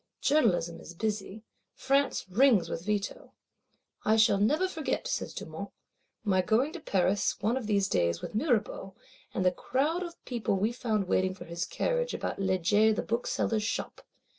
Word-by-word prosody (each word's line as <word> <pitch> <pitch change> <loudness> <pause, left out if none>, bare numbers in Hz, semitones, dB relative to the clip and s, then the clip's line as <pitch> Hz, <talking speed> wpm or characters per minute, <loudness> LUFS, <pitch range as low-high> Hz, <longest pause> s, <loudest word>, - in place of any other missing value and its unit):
Journalism 180 - +2
is 170 - -11
busy, 210 +1 -3 0.3
France 275 -5 +1
rings 205 -3 +4
with 165 - -4
Veto. 205 -1 -3 0.7
"I 215 - +3
shall 215 -2 +4
never 300 - +2
forget," 320 -5 -2
says - - -2
Dumont, - - -7 0.5
"my 190 -3 +3
going 230 - +1
to 355 - -6
Paris, 195 - +1
one 220 +4 +1
of 255 -5 -3
these 200 -2 +2
days, 85 - +1
with - - -7
Mirabeau; 215 - -1 0.4
and 185 - -1
the 180 - +5
crowd 290 - -1
of 345 -2 -5
people 235 -5 -1
we 205 +4 +1
found 220 -5 -1
waiting 185 0 +1
for - - -10
his 170 +1 -3
carriage, - - -1
about - - -4
Le 190 -1 +1
Jay 205 +5 +4
the 215 - -1
Bookseller's 230 -1 0
shop. 225 +4 -3
215 Hz, 165 wpm, -29 LUFS, 190-255 Hz, 0.7 s, the